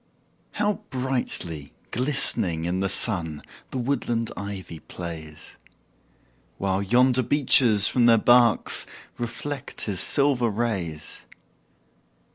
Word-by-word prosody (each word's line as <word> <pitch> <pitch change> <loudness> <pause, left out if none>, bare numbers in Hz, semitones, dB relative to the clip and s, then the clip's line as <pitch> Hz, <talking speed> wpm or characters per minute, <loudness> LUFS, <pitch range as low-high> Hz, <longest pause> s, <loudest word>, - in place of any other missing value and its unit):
How 210 0 -1
brightly 125 - -2 0.2
glistening 120 - 0
in 90 +2 -2
the 95 0 -1
sun 85 -7 0 0.3
The - - -5
woodland 120 -3 -2
ivy 95 -5 -7
plays! 80 -3 -9 1.0
While 95 0 -1
yonder 125 +5 +3
beeches 125 -5 +5
from 120 +1 +3
their 115 -1 +6
barks 120 0 +3 0.3
Reflect 135 +4 -6
his 100 -4 -3
silver 135 0 +2
rays. 95 -9 -4
115 Hz, 95 wpm, -24 LUFS, 90-125 Hz, 1.0 s, their